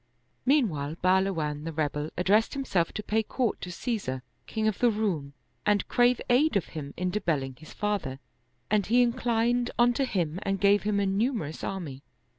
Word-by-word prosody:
Meanwhile, 165 - +2
Bahluwan 180 -6 +1
the 165 - -4
rebel 150 -1 -2
addressed 205 +8 +3
himself 195 -12 0
to 215 - -4
pay 220 +2 +1
court 235 +1 -1
to 180 - -5
Caesar, 170 - -3 0.2
king 220 -1 -1
of 215 - 0
the 245 - +5
Roum 190 -11 -1 0.3
and 205 -1 +2
crave 245 0 +3
aid 255 0 +4
of 185 - -3
him 145 -3 -7
in 180 0 -1
debelling 150 -10 -1
his 155 - -12
father, 200 -11 -2 0.5
and 210 -3 +2
he 245 +3 +5
inclined 240 0 +1
unto 245 +3 +3
him 175 -8 -1
and 195 0 -1
gave 200 +1 +4
him 205 -1 0
a 200 - +1
numerous 195 - -1
army. 160 -9 -4
200 Hz, 170 wpm, -28 LUFS, 160-230 Hz, 0.5 s, the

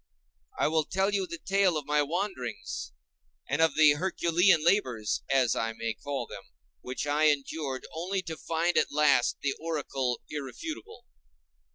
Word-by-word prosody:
I - - +2
will 155 0 +1
tell 195 +2 0
you 195 -2 0
the 170 - -6
tale 195 -2 +2
of 150 - -4
my 150 +1 +2
wanderings 145 - -3 0.6
and 145 +4 0
of 160 - +3
the 155 -1 +7
"Herculean" 170 +1 +2
labors, 125 - +1
as 130 -3 +3
I 115 0 -1
may 115 0 -3
call 140 +4 -4
them, - - -9 0.4
which 125 +2 -4
I 150 +1 +2
endured 140 -2 0
only 185 +4 -2
to 165 -3 -5
find 165 +2 +1
at - - 0
last 145 -4 +3
the 140 -1 +1
oracle 140 -6 -2
irrefutable. 245 - -7
155 Hz, 155 wpm, -29 LUFS, 135-175 Hz, 0.6 s, the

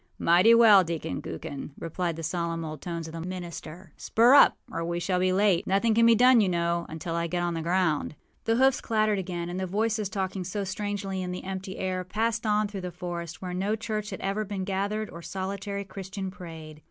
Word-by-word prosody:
â - - -7
âMighty 185 +8 +6
well, 215 -5 +8
Deacon 165 - -4
Gookin!â 135 - -6
replied 170 0 -3
the 165 - -7
solemn 165 0 -2
old 155 -2 -7
tones 170 -2 -4
of 160 - -9
the 165 - -5
minister. 175 -1 -7
âSpur 240 +4 +5
up, - - +7
or 165 - -3
we 170 +1 -2
shall 180 +1 0
be 185 0 +2
late. 190 -2 +2
Nothing 200 +4 +2
can 230 +1 +5
be 230 - +7
done, 250 0 +6
you 195 - +2
know, 170 -1 0
until 160 +1 -5
I 170 0 -1
get 175 +1 -1
on 175 0 0
the 165 - -3
ground.â 170 -3 0 0.3
The 225 - +2
hoofs 265 +2 +3
clattered 215 -2 +1
again; 175 -2 -4
and 175 +1 -4
the 190 - -2
voices, 215 +1 0
talking 190 -1 -3
so 200 +3 -3
strangely 195 0 -3
in 180 -1 -3
the 180 - -5
empty 190 0 -5
air, 185 -1 -2
passed 220 +4 -1
on 210 0 +2
through 200 -2 -6
the 180 - -4
forest, 175 -1 -6
where 180 -1 -4
no 195 +4 0
church 215 -1 -4
had 190 - -6
ever 200 +2 -1
been 200 -2 -4
gathered 200 +3 -2
or 170 - -9
solitary 200 +2 -4
Christian 190 0 -6
prayed. 160 -4 -10
185 Hz, 220 wpm, -27 LUFS, 170-205 Hz, 0.3 s, well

